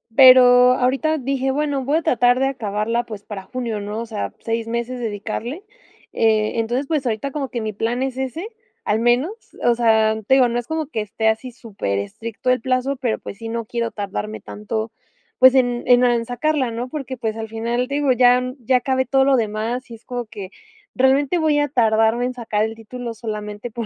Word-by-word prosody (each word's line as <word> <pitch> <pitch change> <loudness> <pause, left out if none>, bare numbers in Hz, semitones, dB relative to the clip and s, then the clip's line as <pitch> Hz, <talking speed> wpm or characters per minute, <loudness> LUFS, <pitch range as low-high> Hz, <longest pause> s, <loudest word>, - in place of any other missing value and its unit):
pero 250 -1 +8
ahorita 270 +5 +1
dije: 270 0 -1
"Bueno, 285 -1 -1
voy 290 +4 +2
a 330 - 0
tratar 245 -2 +3
de 270 - +2
acabarla, 230 -2 -1
pues 210 -3 -8
para 200 -3 -7
junio", 230 0 -4
¿no? 210 +2 -5
O 235 - -4
sea, 215 -2 -4
seis 230 0 -3
meses 235 +2 -3
dedicarle, 225 - -4 0.5
eh, 215 -1 +2
entonces, 245 +5 -1
pues 300 -5 -1
ahorita 235 +4 -2
como 275 -3 -3
que 240 - -4
mi 215 -1 -3
plan 230 +4 -2
es 265 -1 -2
ese, 265 - -4 0.4
al 215 +1 +1
menos, 245 - +2 0.3
o 240 - +4
sea, 220 -2 +3
te 265 - +5
digo, 260 -2 +5
no 240 +1 -1
es 240 - -8
como 320 -2 -2
que 230 -7 -3
esté 215 +1 -2
así 225 +4 -2
superestricto 220 - -4
el 255 - +3
plazo, 255 +2 0
pero 245 -4 -1
pues 200 - -9
sí, 225 - -7
no 230 -1 -3
quiero 235 0 -3
tardarme 210 +1 -5
tanto, 220 +1 -5 0.5
pues 260 0 +7
en 245 -2 +2
en 245 0 +6
en 235 -1 +2
sacarla, 260 +2 0
¿no?, 240 +2 -4
porque, 265 -3 -5
pues, 220 -2 -3
al 225 - -4
final, 235 +3 -2
te 280 - -3
digo, 290 -2 +2
ya 250 0 +5 0.2
ya 250 +2 +1
acabé 260 +1 0
todo 270 +2 +3
lo 275 -1 +4
demás 225 +3 -2
y 230 - -8
es 225 - -19
como 245 -1 -4
que 205 -3 -9 0.4
realmente 270 +5 +3
voy 310 -2 +2
a 290 - +1
tardarme 225 -1 +2
en 255 - -2
sacar 220 -4 -1
el 225 - -5
título 235 +1 -7
solamente 210 0 -6
por 230 0 -4
240 Hz, 205 wpm, -21 LUFS, 220-260 Hz, 0.5 s, pero